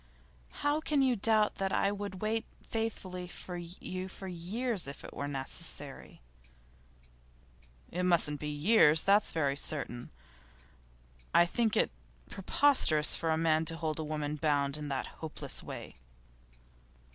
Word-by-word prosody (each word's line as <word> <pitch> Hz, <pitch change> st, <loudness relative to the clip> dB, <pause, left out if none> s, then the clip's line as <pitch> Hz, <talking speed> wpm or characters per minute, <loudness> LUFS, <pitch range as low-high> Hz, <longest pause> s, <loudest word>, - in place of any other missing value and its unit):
'How 290 Hz, +1 st, +3 dB
can 295 Hz, -3 st, +2 dB
you 255 Hz, -2 st, +3 dB
doubt 215 Hz, 0 st, +2 dB
that 195 Hz, -1 st, -1 dB
I 200 Hz, -, +2 dB
would 200 Hz, -1 st, -5 dB
wait 220 Hz, +1 st, 0 dB, 0.2 s
faithfully 190 Hz, -5 st, -3 dB
for 180 Hz, 0 st, -8 dB
you 180 Hz, +2 st, -5 dB
for 190 Hz, +1 st, -9 dB
years 190 Hz, -, -2 dB
if 140 Hz, -, -7 dB
it -, -, -9 dB
were 140 Hz, -, -4 dB
necessary?' 135 Hz, -, -5 dB, 1.7 s
'It 180 Hz, -, -2 dB
mustn't 170 Hz, -5 st, +2 dB
be 150 Hz, -, -4 dB
years, 155 Hz, 0 st, +5 dB
that's 200 Hz, +1 st, +4 dB
very 145 Hz, -4 st, 0 dB
certain. 140 Hz, -4 st, -1 dB, 1.3 s
I 175 Hz, -, +7 dB
think 220 Hz, +4 st, 0 dB
it -, -, +2 dB, 0.4 s
preposterous 195 Hz, -, +4 dB
for 165 Hz, -, -2 dB
a 160 Hz, -, +2 dB
man 160 Hz, -1 st, +2 dB
to 165 Hz, +1 st, -1 dB
hold 160 Hz, -1 st, -2 dB
a -, -, -1 dB
woman 150 Hz, -1 st, -3 dB
bound 145 Hz, -2 st, +1 dB
in 150 Hz, -1 st, -4 dB
that 135 Hz, -2 st, -2 dB, 0.2 s
hopeless 160 Hz, -2 st, -2 dB
way. -, -, -8 dB
175 Hz, 140 wpm, -32 LUFS, 150-205 Hz, 1.7 s, I